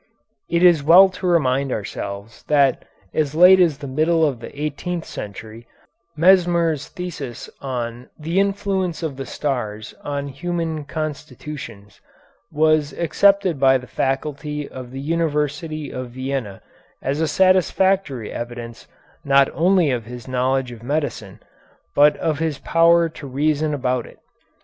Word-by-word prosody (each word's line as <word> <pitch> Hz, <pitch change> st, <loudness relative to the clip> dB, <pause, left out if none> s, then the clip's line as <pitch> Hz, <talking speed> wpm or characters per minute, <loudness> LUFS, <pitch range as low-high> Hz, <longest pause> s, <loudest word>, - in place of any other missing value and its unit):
It 170 Hz, +1 st, +1 dB
is 175 Hz, -4 st, +6 dB
well 175 Hz, +6 st, +7 dB
to 185 Hz, 0 st, -5 dB
remind 140 Hz, -6 st, +2 dB
ourselves 100 Hz, 0 st, -6 dB
that 140 Hz, -3 st, +2 dB, 0.3 s
as 155 Hz, -2 st, -1 dB
late 180 Hz, +3 st, +8 dB
as 165 Hz, -6 st, +3 dB
the 140 Hz, -, -8 dB
middle 160 Hz, +4 st, +2 dB
of 135 Hz, -6 st, -1 dB
the -, -, -8 dB
eighteenth 160 Hz, +3 st, -3 dB
century 110 Hz, +3 st, -9 dB, 0.5 s
Mesmer's 170 Hz, -3 st, +3 dB
thesis 150 Hz, -9 st, -7 dB
on 120 Hz, -2 st, -5 dB
"The 165 Hz, +4 st, -1 dB
Influence 195 Hz, -3 st, -1 dB
of 155 Hz, -4 st, -3 dB
the 135 Hz, 0 st, -7 dB
Stars 110 Hz, -7 st, -4 dB
on 140 Hz, -1 st, -3 dB
Human 165 Hz, +1 st, -3 dB
Constitutions" 145 Hz, -7 st, -7 dB, 0.5 s
was 155 Hz, -1 st, +2 dB
accepted 190 Hz, -1 st, +2 dB
by 135 Hz, -1 st, +5 dB
the 125 Hz, -, -10 dB
faculty 145 Hz, +3 st, -3 dB
of 130 Hz, -1 st, -9 dB
the 135 Hz, +2 st, -7 dB
University 155 Hz, 0 st, -2 dB
of 130 Hz, -1 st, -5 dB
Vienna 130 Hz, -5 st, -5 dB, 0.4 s
as 140 Hz, +4 st, -1 dB
a 160 Hz, -, +2 dB
satisfactory 185 Hz, -, +2 dB
evidence 120 Hz, -1 st, -7 dB, 0.4 s
not 140 Hz, -1 st, +4 dB
only 175 Hz, -3 st, +3 dB
of 120 Hz, -3 st, -2 dB
his 120 Hz, 0 st, -9 dB
knowledge 130 Hz, 0 st, 0 dB
of 115 Hz, -2 st, -11 dB
medicine, 130 Hz, -7 st, -3 dB, 0.5 s
but 145 Hz, +1 st, +5 dB
of 155 Hz, -3 st, -1 dB
his 160 Hz, -3 st, -1 dB
power 170 Hz, +3 st, +4 dB
to 155 Hz, -3 st, -10 dB
reason 150 Hz, +3 st, 0 dB
about 130 Hz, -4 st, -1 dB
it. -, -, -16 dB
145 Hz, 135 wpm, -21 LUFS, 130-165 Hz, 0.5 s, late